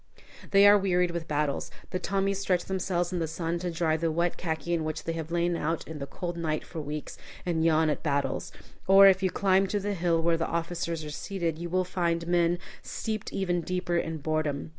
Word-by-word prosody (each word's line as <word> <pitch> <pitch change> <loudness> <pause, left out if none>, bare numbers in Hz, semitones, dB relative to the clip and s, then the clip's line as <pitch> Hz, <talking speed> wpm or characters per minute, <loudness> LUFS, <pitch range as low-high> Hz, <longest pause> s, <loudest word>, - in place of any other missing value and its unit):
They 200 0 +7
are 205 0 +7
wearied 180 -2 +2
with 170 -1 -4
battles. 150 -1 -1 0.2
The 185 - -1
Tommies 195 +1 0
stretch 185 -3 0
themselves 185 -2 -1
in 180 - -1
the 165 - -1
sun 165 +1 -2
to 180 0 -2
dry 165 -2 +1
the 165 +1 0
wet 170 +2 0
khaki 170 0 -3
in 165 -2 0
which 155 0 -3
they 165 - -2
have 160 -1 -5
lain 170 0 +1
out 165 0 -2
in 160 -2 -7
the 140 - -5
cold 175 +4 -5
night 155 -2 -2
for 165 - -6
weeks, 150 0 -6 0.3
and 165 -2 0
yawn 160 -1 +4
at 150 - 0
battles. 140 -3 -1 0.4
Or, 195 +1 +9
if 190 -1 +6
you 190 - +2
climb 195 +1 +2
to 205 +2 -1
the 205 +1 -2
hill 170 -2 +1
where 165 0 +2
the 165 - -1
officers 170 -1 -2
are 150 - -6
seated, 165 +1 -3
you 170 0 -4
will 185 +1 +1
find 170 -2 -1
men 175 0 +2 0.2
steeped 220 -1 -4
even 175 -3 0
deeper 180 0 -2
in 165 -1 -1
boredom. 150 - -2
170 Hz, 220 wpm, -28 LUFS, 160-185 Hz, 0.4 s, Or